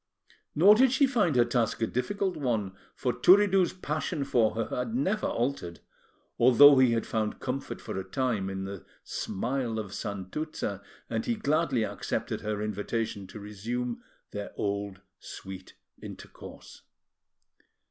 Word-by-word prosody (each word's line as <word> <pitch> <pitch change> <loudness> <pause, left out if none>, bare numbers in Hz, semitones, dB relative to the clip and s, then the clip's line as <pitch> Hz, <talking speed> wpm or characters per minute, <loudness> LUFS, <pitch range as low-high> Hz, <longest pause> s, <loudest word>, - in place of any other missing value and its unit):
Nor 190 +7 +8
did 255 +3 +5
she 265 +2 +4
find 215 - +1
her 120 -1 +5
task 120 -2 0
a 115 - +2
difficult 190 - -1
one; 115 -9 -1 0.2
for 125 -2 -1
Turiddu's 195 -1 +5
passion 155 -3 -3
for 115 -5 +2
her 115 0 0
had 120 -2 -2
never 190 - 0
altered, 120 -9 -2 0.6
although 130 +3 +8
he 125 -3 +5
had 115 - 0
found 110 -1 -2
comfort 135 +1 -4
for - - -6
a - - -4
time 115 -6 -1
in 95 0 -4
the 100 -1 -7 0.2
smile 120 +2 -2
of 105 -3 -5
Santuzza, 100 - -4 0.3
and 110 -1 -3
he 235 - +1
gladly 155 - +1
accepted - - -3
her 105 0 -2
invitation 105 -1 -3
to 105 - -10
resume 115 +4 -4 0.3
their 105 0 -5
old 100 -1 -3 0.2
sweet 95 -1 -9 0.3
intercourse. - - -11
120 Hz, 140 wpm, -28 LUFS, 105-150 Hz, 0.6 s, Nor